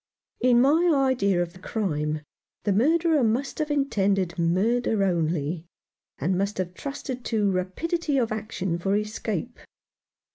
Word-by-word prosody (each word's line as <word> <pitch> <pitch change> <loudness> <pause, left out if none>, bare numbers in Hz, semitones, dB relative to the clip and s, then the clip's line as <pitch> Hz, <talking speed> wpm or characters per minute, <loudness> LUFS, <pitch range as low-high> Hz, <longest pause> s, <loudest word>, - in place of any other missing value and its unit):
In 245 -1 +4
my 320 +7 +4
idea 245 -10 +2
of 170 -1 -8
the 185 - -14
crime, 155 -8 -2 0.4
the 205 - +2
murderer 315 - +3
must 240 +7 0
have 305 -1 -1
intended 200 -11 +1
murder 205 +6 +2
only, 165 -2 -1 0.5
and 180 +7 0
must 200 +3 -1
have 180 -1 -3
trusted 265 +1 -6
to 210 -3 +1
rapidity 285 - -1
of 235 -4 +1
action 200 -5 -3
for 195 +3 +1
escape. 210 +1 -3
210 Hz, 135 wpm, -26 LUFS, 180-260 Hz, 0.5 s, In